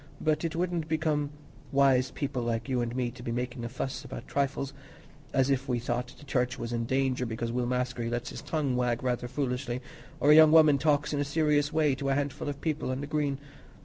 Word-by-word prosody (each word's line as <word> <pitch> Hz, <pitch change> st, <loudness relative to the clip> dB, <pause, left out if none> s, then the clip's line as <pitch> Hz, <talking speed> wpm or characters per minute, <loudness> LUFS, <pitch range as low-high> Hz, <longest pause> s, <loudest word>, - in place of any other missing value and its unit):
But 155 Hz, 0 st, +1 dB
it 165 Hz, -1 st, -2 dB
wouldn't 170 Hz, -2 st, -1 dB
become 155 Hz, -2 st, 0 dB, 0.4 s
wise 135 Hz, -2 st, +4 dB
people 135 Hz, -3 st, -3 dB
like 115 Hz, -1 st, -2 dB
you 130 Hz, -2 st, 0 dB
and 120 Hz, 0 st, -3 dB
me 125 Hz, -2 st, -1 dB
to 125 Hz, 0 st, -12 dB
be 120 Hz, -, -4 dB
making 120 Hz, 0 st, -3 dB
a 120 Hz, -, -3 dB
fuss 130 Hz, +1 st, -4 dB
about -, -, -8 dB
trifles, 140 Hz, 0 st, -1 dB, 0.6 s
as 135 Hz, +1 st, +2 dB
if 135 Hz, 0 st, 0 dB
we 125 Hz, -, +2 dB
thought 120 Hz, +1 st, -3 dB
the 145 Hz, -, -14 dB
Church 130 Hz, -1 st, 0 dB
was 120 Hz, 0 st, -4 dB
in 115 Hz, -1 st, -1 dB
danger 130 Hz, 0 st, +1 dB
because 115 Hz, 0 st, -3 dB
Will 120 Hz, 0 st, -1 dB
Maskery 125 Hz, -2 st, -1 dB
lets 120 Hz, 0 st, -3 dB
his -, -, -7 dB
tongue 145 Hz, -5 st, -1 dB
wag 125 Hz, -1 st, 0 dB
rather 125 Hz, -1 st, -1 dB
foolishly, 125 Hz, -1 st, -2 dB, 0.4 s
or 145 Hz, -, +5 dB
a -, -, +9 dB
young 155 Hz, -1 st, +8 dB
woman 155 Hz, -3 st, +7 dB
talks 145 Hz, 0 st, +2 dB
in 145 Hz, -, 0 dB
a -, -, +2 dB
serious 150 Hz, 0 st, +2 dB
way 155 Hz, -3 st, +3 dB
to 135 Hz, +1 st, -2 dB
a 135 Hz, -, +2 dB
handful 145 Hz, +1 st, -2 dB
of 140 Hz, -1 st, -6 dB
people 155 Hz, -4 st, -1 dB
on 130 Hz, +1 st, -2 dB
the -, -, -3 dB
Green. 145 Hz, -2 st, -1 dB
135 Hz, 225 wpm, -29 LUFS, 125-145 Hz, 0.6 s, a